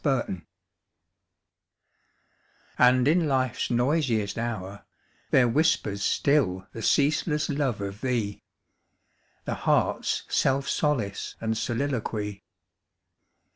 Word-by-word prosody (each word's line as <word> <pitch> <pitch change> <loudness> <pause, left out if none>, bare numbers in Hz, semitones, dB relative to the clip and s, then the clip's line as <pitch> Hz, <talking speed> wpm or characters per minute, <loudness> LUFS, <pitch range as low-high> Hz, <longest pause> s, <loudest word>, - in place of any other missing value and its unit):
25 130 - 0 2.4
And 125 +1 +5
in 165 +1 +3
Life's 130 -3 0
noisiest 120 -5 +1
hour 100 -4 -4 0.5
There 125 -2 +5
whispers 130 -7 +1
still 95 -9 +1
the 115 - -6
ceaseless 150 +4 +1
love 140 -7 -1
of 100 +1 -5
thee, 115 -6 -2 1.0
The - - -2
heart's - - 0
self 135 +1 +1
solace 120 -10 -1
} - - -36
and 110 0 -1
soliloquy. 115 -4 -2
125 Hz, 95 wpm, -26 LUFS, 105-140 Hz, 2.4 s, And